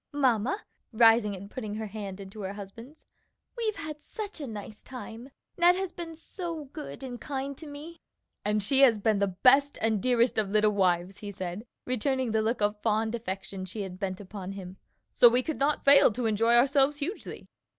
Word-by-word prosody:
"Mamma," 265 Hz, -, +1 dB, 0.3 s
rising 225 Hz, -2 st, +5 dB
and 195 Hz, +1 st, -9 dB
putting 215 Hz, -5 st, -5 dB
her 220 Hz, 0 st, -4 dB
hand 205 Hz, -2 st, -6 dB
into 195 Hz, +2 st, -9 dB
her 195 Hz, 0 st, -4 dB
husband's, 230 Hz, +9 st, -11 dB, 0.5 s
"we've 450 Hz, -3 st, -1 dB
had 305 Hz, -1 st, -7 dB
such 415 Hz, -4 st, -7 dB
a 285 Hz, -, -4 dB
nice 215 Hz, -1 st, -8 dB
time! 245 Hz, -1 st, -9 dB, 0.3 s
Ned 350 Hz, +1 st, +6 dB
has 380 Hz, -1 st, -3 dB
been 335 Hz, -2 st, -7 dB
so 330 Hz, -2 st, -6 dB
good 285 Hz, 0 st, -8 dB
and 245 Hz, -2 st, -7 dB
kind 275 Hz, -1 st, -4 dB
to 315 Hz, -, -9 dB
me!" 300 Hz, +4 st, -10 dB, 0.4 s
"And 210 Hz, 0 st, 0 dB
she 265 Hz, +6 st, +2 dB
has 255 Hz, -5 st, +6 dB
been 210 Hz, 0 st, +1 dB
the 200 Hz, -, +2 dB
best 265 Hz, +9 st, +4 dB
and 220 Hz, -2 st, +1 dB
dearest 245 Hz, -2 st, +2 dB
of 205 Hz, -2 st, -1 dB
little 215 Hz, +1 st, +3 dB
wives," 185 Hz, -1 st, +1 dB
he 205 Hz, -, -7 dB
said, 185 Hz, +4 st, -6 dB, 0.2 s
returning 255 Hz, 0 st, 0 dB
the 220 Hz, 0 st, +2 dB
look 225 Hz, +1 st, -1 dB
of 210 Hz, 0 st, 0 dB
fond 220 Hz, 0 st, +1 dB
affection 195 Hz, -4 st, -5 dB
she 200 Hz, +3 st, -5 dB
had 185 Hz, -1 st, -8 dB
bent 185 Hz, -2 st, -3 dB
upon 195 Hz, -1 st, -7 dB
him, 190 Hz, -1 st, -9 dB, 0.4 s
"so 240 Hz, -, +8 dB
we 250 Hz, +2 st, +2 dB
could 315 Hz, -, -4 dB
not 285 Hz, +2 st, +1 dB
fail 280 Hz, -3 st, +7 dB
to 245 Hz, +2 st, -3 dB
enjoy 225 Hz, +2 st, +3 dB
ourselves 275 Hz, +3 st, +4 dB
hugely." 325 Hz, +9 st, -5 dB
230 Hz, 190 wpm, -28 LUFS, 205-280 Hz, 0.5 s, so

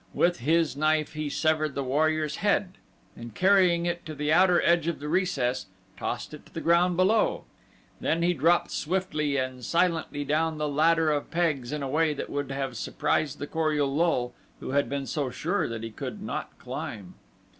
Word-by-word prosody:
With 175 Hz, -3 st, +2 dB
his 160 Hz, +3 st, +2 dB
knife 155 Hz, +1 st, +1 dB
he 155 Hz, -1 st, -3 dB
severed 155 Hz, 0 st, 0 dB
the 140 Hz, -, -1 dB
warrior's 155 Hz, +3 st, 0 dB
head 200 Hz, -2 st, 0 dB, 0.4 s
and 115 Hz, -2 st, -10 dB
carrying 185 Hz, -3 st, +4 dB
it 175 Hz, 0 st, -2 dB
to 155 Hz, -, -6 dB
the 150 Hz, +1 st, 0 dB
outer 180 Hz, 0 st, +5 dB
edge 170 Hz, -1 st, +3 dB
of 170 Hz, -, -2 dB
the 145 Hz, -, -6 dB
recess 145 Hz, -, 0 dB, 0.3 s
tossed -, -, -4 dB
it -, -, -10 dB
to -, -, -22 dB
the -, -, -2 dB
ground 170 Hz, +1 st, +3 dB
below, 205 Hz, +4 st, +2 dB, 0.6 s
then 165 Hz, +2 st, 0 dB
he 175 Hz, +1 st, +3 dB
dropped 170 Hz, +3 st, +2 dB
swiftly 155 Hz, -5 st, -1 dB
and 130 Hz, -1 st, -3 dB
silently 165 Hz, -2 st, 0 dB
down 155 Hz, +2 st, 0 dB
the 150 Hz, 0 st, -1 dB
ladder 160 Hz, +2 st, +3 dB
of 145 Hz, -1 st, -2 dB
pegs 155 Hz, -8 st, 0 dB
in 150 Hz, -1 st, -3 dB
a -, -, -2 dB
way 155 Hz, +2 st, +1 dB
that -, -, -5 dB
would 145 Hz, -1 st, -3 dB
have 135 Hz, -3 st, -3 dB
surprised 150 Hz, +5 st, -1 dB
the 145 Hz, -, -4 dB
Kor 155 Hz, 0 st, 0 dB
ul 140 Hz, -2 st, 0 dB
lul 135 Hz, -7 st, +1 dB, 0.3 s
who -, -, -6 dB
had 140 Hz, +1 st, +1 dB
been 140 Hz, -1 st, -3 dB
so 135 Hz, +2 st, -2 dB
sure 180 Hz, +10 st, -1 dB
that 115 Hz, -1 st, -5 dB
he 115 Hz, -, -5 dB
could -, -, -6 dB
not -, -, -5 dB
climb. 95 Hz, -4 st, -6 dB
155 Hz, 190 wpm, -27 LUFS, 140-170 Hz, 0.6 s, outer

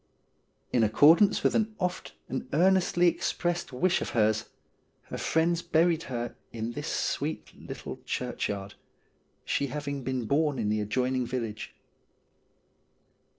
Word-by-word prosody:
In 120 Hz, -, +4 dB
accordance 155 Hz, -, +5 dB
with -, -, +3 dB
an 220 Hz, -1 st, 0 dB
oft 180 Hz, -1 st, -3 dB
and 130 Hz, 0 st, -4 dB
earnestly 180 Hz, +1 st, +4 dB
expressed 175 Hz, 0 st, -1 dB
wish 175 Hz, +8 st, +1 dB
of -, -, -3 dB
hers, 110 Hz, 0 st, +3 dB, 0.6 s
her -, -, -4 dB
friends 165 Hz, +1 st, +1 dB
buried 165 Hz, 0 st, +2 dB
her 120 Hz, -2 st, -3 dB, 0.2 s
in 115 Hz, 0 st, -4 dB
this -, -, -5 dB
sweet -, -, -2 dB
little -, -, -8 dB
churchyard, 100 Hz, -1 st, -3 dB, 0.7 s
she 140 Hz, -, 0 dB
having 140 Hz, 0 st, -4 dB
been 130 Hz, -1 st, -2 dB
born 145 Hz, +3 st, +1 dB
in 110 Hz, -3 st, -1 dB
the 105 Hz, 0 st, +1 dB
adjoining 125 Hz, +4 st, 0 dB
village. 115 Hz, -4 st, -4 dB
140 Hz, 125 wpm, -28 LUFS, 115-170 Hz, 0.7 s, accordance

